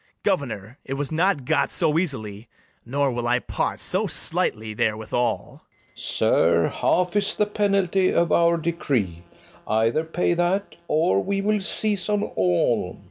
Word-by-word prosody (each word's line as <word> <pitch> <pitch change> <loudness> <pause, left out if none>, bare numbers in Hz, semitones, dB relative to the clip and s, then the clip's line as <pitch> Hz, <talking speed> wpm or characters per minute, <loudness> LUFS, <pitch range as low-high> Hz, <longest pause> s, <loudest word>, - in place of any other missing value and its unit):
Governor, 120 -2 -2
it 135 - -4
was 145 +1 -2
not 160 -4 +1
got - - +1
so 160 -2 +2
easily; 110 - -3 0.3
Nor 140 +3 0
will 120 0 -3
I 120 +1 +3
part - - -3
so - - 0
slightly 110 0 -1
therewithal. 110 +2 -2
FERNEZE. - - -17
Sir, 85 0 +2
half 180 +1 0
is 205 -1 +1
the 210 - +2
penalty 195 -3 +1
of 170 -2 +2
our 170 +1 +4
decree; 135 - -1 0.5
Either 115 +7 +1
pay 170 +2 0
that, 175 +3 0
or 100 - +2
we 200 0 -1
will 210 0 +1
seize 205 0 -1
on 210 0 +1
all. 90 - 0
150 Hz, 145 wpm, -24 LUFS, 115-185 Hz, 0.5 s, our